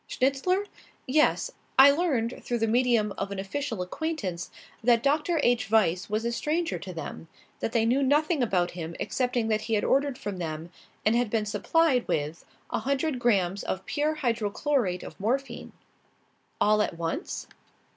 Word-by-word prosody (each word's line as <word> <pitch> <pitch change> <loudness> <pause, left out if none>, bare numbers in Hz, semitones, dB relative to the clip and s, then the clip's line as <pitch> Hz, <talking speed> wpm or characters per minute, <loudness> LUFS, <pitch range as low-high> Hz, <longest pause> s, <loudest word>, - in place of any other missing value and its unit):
"Schnitzler? 275 +10 +1 0.4
Yes. 300 +4 +2 0.3
I 270 +1 +10
learned, 280 -7 0
through 240 - -1
the 225 - +1
medium 230 -2 +2
of 195 - -2
an 200 - -5
official 220 +1 -3
acquaintance, 185 - -4 0.3
that 235 0 +4
Dr. 300 +4 +2
H. 240 -4 +2
Weiss 190 -5 +2
was 215 +2 -1
a 235 - 0
stranger 315 +8 -1
to 190 - -7
them; 165 -1 -7 0.3
that - - -2
they 225 -1 +2
knew 250 +4 +2
nothing 295 +3 +2
about 185 -7 +1
him 170 -1 -6
excepting 250 -3 0
that 215 -1 +1
he 220 +1 -1
had 205 - +1
ordered 275 -1 +2
from 200 -2 -5
them, 165 -1 -5 0.3
and 235 +2 +3
been 215 -1 0
supplied 250 +6 +2
with, 150 +2 -2 0.3
a - - 0
hundred 275 0 -1
grammes 200 -5 +2
of 185 - -3
pure 300 +2 0
hydrochlorate 235 -4 0
of - - -10
morphine." 260 +7 -2 0.9
"All 210 0 +4
at 175 - -2
once?" 170 - -3
235 Hz, 160 wpm, -27 LUFS, 200-280 Hz, 0.9 s, I